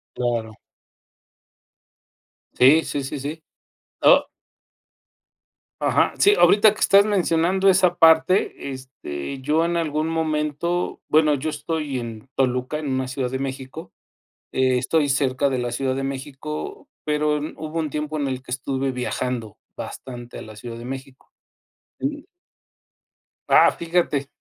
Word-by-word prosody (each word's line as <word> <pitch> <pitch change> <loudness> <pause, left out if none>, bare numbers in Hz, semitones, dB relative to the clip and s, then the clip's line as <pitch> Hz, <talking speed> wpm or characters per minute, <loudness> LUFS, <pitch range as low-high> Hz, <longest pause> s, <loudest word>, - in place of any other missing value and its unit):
Claro. 115 -3 -1 2.0
Sí, 145 +6 +6
sí, 140 - -3
sí, 140 +2 -5
sí. 150 +4 -6 0.6
Oh. - - +6 1.5
Ajá. - - +2
Sí, 410 +1 +6
ahorita 210 0 +6
que - - -11
estás 200 +1 +6
mencionando 190 -1 +2
esa 185 -2 +4
parte, 160 -2 +3
este, 130 - -7
yo 155 +4 +1
en 170 0 0
algún 155 -1 -1
momento 160 +2 -1
bueno, 155 -1 +4
yo 150 +3 -2
estoy 150 -2 -3
en 115 +1 -7
Toluca, 125 +2 0
en 150 -2 -4
una 130 0 -1
ciudad 130 -1 -2
de 130 - -2
México, 135 +5 -6 0.6
eh, 130 -1 +2
estoy 145 +3 +1
cerca 140 0 +1
de 130 - -1
la 120 -1 -2
Ciudad 130 +1 -1
de 135 - -3
México, 150 - -6 0.2
pero 150 0 +1
mm, 150 - -5
hubo 155 +1 -5
un 155 -3 -2
tiempo 150 +1 -3
en 140 - -1
el 130 -1 -4
que 130 - -13
estuve 135 +1 -2
viajando, 125 -3 -3 0.2
bastante, 120 -2 -8
a - - -7
la 110 -1 -11
Ciudad 115 +1 -8
de 120 - -9
México. 135 +1 -9 0.7
Y 290 +1 -3 1.2
¡Ah!, - - +7
fíjate. 165 -5 -1
145 Hz, 140 wpm, -23 LUFS, 130-160 Hz, 2.0 s, Ah